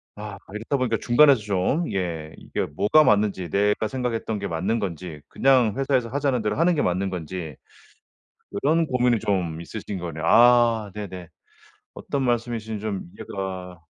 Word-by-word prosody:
아 105 -1 -7 0.2
이렇다 115 +6 -2
보니까 120 -3 0
중간에서 135 +1 +5
좀 105 - 0
예 85 -5 -3
이게 - - -3
뭐가 155 +9 +3
맞는지 100 - +1
내가 105 +4 +1
생각했던 115 -4 -2
게 100 - -3
맞는 95 +7 -1
건지 85 -5 -5
그냥 130 -6 +3
회사에서 130 -4 +1
하자는 135 -3 0
대로 105 +2 -1
하는 170 +1 +3
게 145 - +1
맞는 95 +2 0
건지 85 -3 -6 1.1
그런 160 +3 +3
고민이 125 -4 +2
좀 90 -5 -1
있으신 95 +4 -6
거네요. 80 -2 -6
아 115 -1 +5
네네. 95 -5 -7 0.7
어떤 140 -1 -3
말씀이신지 115 -3 -2
좀 105 -3 -3
이해가 95 -3 -6
105 Hz, 325 characters per minute, -24 LUFS, 95-125 Hz, 1.1 s, 중간에서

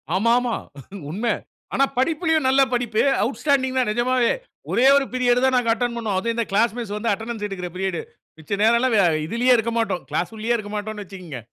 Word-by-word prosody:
ஆமா, 230 +5 +2
ஆமா. 245 -2 -1 0.5
உண்மை. 220 +8 -1 0.4
ஆனா 275 - +4
படிப்புலயும் 320 +1 +1
நல்லா 270 +1 +5
படிப்பு. 235 -3 0 0.2
அவுட்ஸ்டாண்டிங் 265 +1 0
தான் 245 - +1
நெஜமாவே. 240 +1 +2 0.4
ஒரே 255 +3 +4
ஒரு 280 -1 +3
பீரியட் 250 0 +2
தான் 260 -1 +3
நாங்க 235 -2 +1
அட்டெண்ட் 235 +1 -2
பண்ணுவோம். 210 -5 -2
அதுவும் 230 +3 -2
இந்த 235 -2 0
கிளாஸ் 220 +3 +2
மிஸ் 210 -4 -4
வந்து 225 0 0
அட்டெண்டன்ஸ் 225 0 -5
எடுக்கிற 180 -3 -5
பீரியடு. 190 -3 -2 0.4
மிச்ச 160 +6 -3
நேரம்ல்லாம் 235 +2 +3
வ - - +4 0.3
இதுலயே 245 +4 +3
இருக்க 230 +1 -1
மாட்டோம். 220 -6 -1
கிளாஸ் 180 +6 -2
உள்ளயே 235 +2 0
இருக்க 205 -1 -7
மாட்டோம்ன்னு 210 -1 -5
வச்சுங்க. 180 - -9
230 Hz, 185 wpm, -22 LUFS, 210-250 Hz, 0.5 s, நல்லா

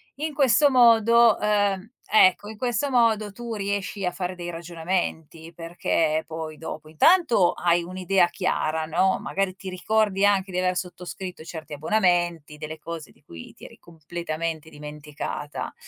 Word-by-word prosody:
In 305 +3 -4
questo 285 +1 +5
modo, 235 -2 +5
ehm 205 -1 0 0.2
ecco, 205 0 +5
in 220 - -9
questo 245 +4 -1
modo 225 -4 +2
tu 235 +2 -6
riesci 200 -1 -3
a 180 - 0
fare 180 0 -4
dei 175 -1 -6
ragionamenti 165 -1 -4
perché 165 -2 -1
poi 160 -1 -6
dopo 155 -1 -8
intanto 235 - +4
hai 175 0 +1
un'idea 185 +1 +1
chiara, 170 -3 -1
no, 180 +4 +1
magari 195 -1 -2
ti 190 0 -8
ricordi 205 +1 +1
anche 195 -1 +2
di 180 - -4
aver 185 0 0
sottoscritto 180 0 -6
certi 160 -2 -9
abbonamenti, 175 -2 0
delle 155 +1 -7
cose 165 -1 -8
di - - -29
cui 85 - -12
ti - - -20
eri - - -14
completamente 165 -1 -6
dimenticata 150 -1 -7
180 Hz, 145 wpm, -24 LUFS, 160-205 Hz, 0.2 s, questo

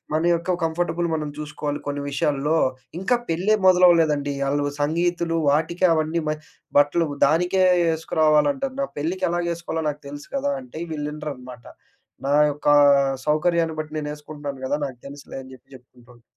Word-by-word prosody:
మన 160 +2 +1
యొక్క 170 +2 0
కంఫర్టబుల్ 170 +1 -1
మనం 155 -1 -2
చూసుకోవాలి 150 -1 -4
కొన్ని 145 0 -3
విషయాలలో. 145 +2 0 0.4
ఇంకా 240 +6 +2
పెళ్ళే 185 +6 +2
మొదలవ్వ‌లేదండి. 165 -6 +4
ఆళ్ళు 145 +1 0 0.2
సంగీతులు 170 +2 0
వాటికి 160 +5 0
అవన్నీ 160 +1 0
మ 155 - +1 0.5
బట్టలు 150 +3 +3 0.2
దానికే 180 +5 +2 0.2
ఏ‌‌‌‌‌సుకు 160 -1 -2
రావాలంటాన్నా 270 - +2
పెళ్ళికెలాగేసుకోవాలో 170 0 -2
నాకు 150 0 -5
తెలుసు 145 0 -9
కదా! 285 +1 0
అంటే, 240 -11 -10
వీళ్ళినరనమాట. 145 -5 -6 0.6
నా 140 - +2 0.2
యొక్క 145 0 -3 0.6
సౌకర్యాన్ని 160 +1 +1
బట్టి 155 0 -7
నేను 150 -1 -4
ఏసుకుంటున్నాను 145 -3 -8
గదా! 145 - 0
నాకు 130 -3 -9
తెలుసులే 140 -1 -9
అని 130 - -13
జెప్పి 130 - -20
జెప్పుకుంటాను. 125 -1 -21
155 Hz, 135 wpm, -23 LUFS, 145-170 Hz, 0.6 s, మొదలవ్వ‌లేదండి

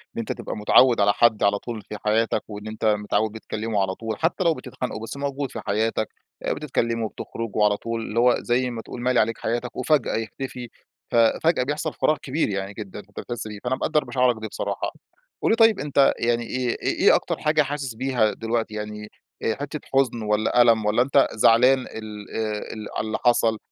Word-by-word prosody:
إن - - -3
أنت - - -3
تبقى - - -5
متعوّد 115 +2 +5
على 100 0 +4
حد 115 -3 +3
على 100 0 +3
طول 115 -3 -6
في 105 +2 -8
حياتك 110 +2 +1
وإن 105 0 -7
أنت 110 +1 -5
متعوّد 105 0 +1
بتكلّمه 110 -1 -3
على 95 0 -1
طول. 110 -1 -4
حتّى 170 +3 +1
لو 165 -1 +4
بتتخانقوا 125 -4 -6
بس 125 - -6
موجود 140 -1 -3
في 115 - -6
حياتك، 110 +1 0 0.4
آآ - - 0
بتتكلّموا 115 -6 -1
وبتخرجوا 110 0 -2
على 105 -1 +2
طول، 115 0 -4
اللي 110 +1 -2
هو 125 0 +5
زي 125 +1 0
ما 115 -1 -5
تقول 120 - -8
مالي 125 0 +2
عليك 115 +1 +1
حياتك، 120 +1 -3
وفجأة 140 0 +1
يختفي، 120 +2 -5 0.4
ف - - -2
فجأة 125 +6 +3
بيحصل 150 +3 -2
فراغ 155 - +1
كبير 140 -2 -1
يعني 95 0 -3
جدًا 105 -1 -8
أنت - - -11
بتحس 120 -2 -5
بيه، 105 -1 -8
فأنا 125 +1 0
مقدّر 150 +3 0
مشاعرك 125 -2 +2
دي 110 - -3
بصراحة. - - -3 0.5
قُل - - +2
لي - - +4
طيب 225 -2 +5
أنت 140 -1 +3
يعني 120 0 +1
إيه 125 +1 -2
إيه - - 0
إيه - - +6
أكتر - - -1
حاجة 155 0 +2
حاسس 140 -4 -3
بيها 125 -4 +1
دلوقتي؟ 115 -1 -2
يعني، 105 0 -6 0.3
آآ 110 - +1
حتّة 145 +2 -5
حُزن 130 -4 +2
والّا 105 +3 +2
ألم 115 -3 +4
والّا 110 +3 +3
أنت 140 +1 +4
زعلان 125 +4 +5
ال 105 -4 -8
آآ 110 -1 -3
ال 110 -1 -7
على 110 - -2
اللي 110 - -1
حصل 115 -2 +3
115 Hz, 205 wpm, -24 LUFS, 110-130 Hz, 0.5 s, إيه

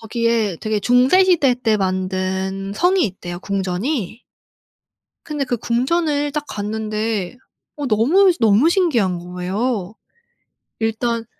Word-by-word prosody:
거기에 230 -4 0
되게 215 -1 -1
중세 250 - +4
시대 305 -9 +3
때 230 -3 +1
만든 190 0 -2
성이 360 - +2
있대요, 175 -2 -7
궁전이. 200 - -3 1.0
근데 295 -3 -3
그 245 -1 -2
궁전을 290 +5 0
딱 300 0 -3
갔는데 215 0 -3 0.4
어 290 - -4
너무 310 - +4
너무 225 +7 +4
신기한 240 - +1
거예요. 185 +4 -3 0.9
일단 225 +1 -1
225 Hz, 225 characters per minute, -20 LUFS, 195-265 Hz, 1.0 s, 중세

